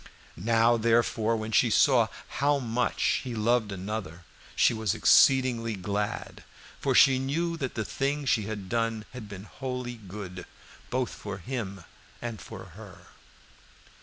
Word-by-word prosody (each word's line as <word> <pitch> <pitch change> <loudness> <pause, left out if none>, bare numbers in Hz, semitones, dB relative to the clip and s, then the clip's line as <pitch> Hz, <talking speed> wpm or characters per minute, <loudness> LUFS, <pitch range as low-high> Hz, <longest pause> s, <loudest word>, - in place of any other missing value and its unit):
Now, 115 +3 +3
therefore, 115 0 +2
when 110 0 -5
she 105 - +4
saw - - +4 0.3
how 145 0 +4
much 125 -2 0
he 125 -3 -5
loved 110 -1 +1
another, 95 -3 -5 0.3
she - - +4
was 110 -3 -1
exceedingly 125 -4 +4
glad, 100 +2 -4 0.4
for - - 0
she 130 -1 +6
knew 165 +6 -1
that 135 -5 -4
the 110 - -2
thing 140 +1 -2
she 110 -5 +2
had 105 -3 -5
done 115 0 -1
had 115 -5 -8
been 100 -1 -8
wholly 125 0 -5
good, 95 -3 -8 0.4
both 125 -1 -1
for 100 -2 -7
him 100 -3 -5 0.4
and 115 -3 -6
for - - -9
her. - - -13
115 Hz, 140 wpm, -28 LUFS, 105-125 Hz, 0.4 s, she